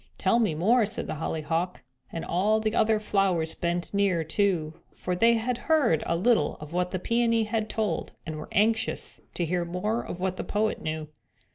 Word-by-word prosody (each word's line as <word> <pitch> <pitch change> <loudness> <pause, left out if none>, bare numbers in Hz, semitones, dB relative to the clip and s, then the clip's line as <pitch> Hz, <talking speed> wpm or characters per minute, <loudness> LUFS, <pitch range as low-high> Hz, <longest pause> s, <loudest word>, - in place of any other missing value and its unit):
"Tell 235 - +3
me 210 -9 +1
more," 215 +7 +3
said 215 - -4
the - - -4
Hollyhock, 165 +3 -2 0.3
and 165 - -4
all 205 +5 +2
the 215 0 -1
other 220 -1 +3
flowers 195 -6 +1
bent 170 0 -2
near, 195 -5 +2
too, 160 -2 0 0.2
for 180 - -2
they 230 +5 +5
had 235 +2 -1
heard 275 - +4
a 170 - +1
little 190 -3 +2
of 150 +1 -10
what 180 0 0
the 185 - -2
Peony 230 +3 +2
had 220 0 -2
told 220 -2 -2
and 155 -1 -5
were 155 - -8
anxious 225 +3 +1
to 175 - 0
hear 175 +1 0
more 180 +7 -1
of 175 - -6
what 185 0 -1
the - - -3
poet 215 +1 -1
knew. 155 0 -3
190 Hz, 190 wpm, -27 LUFS, 170-220 Hz, 0.3 s, they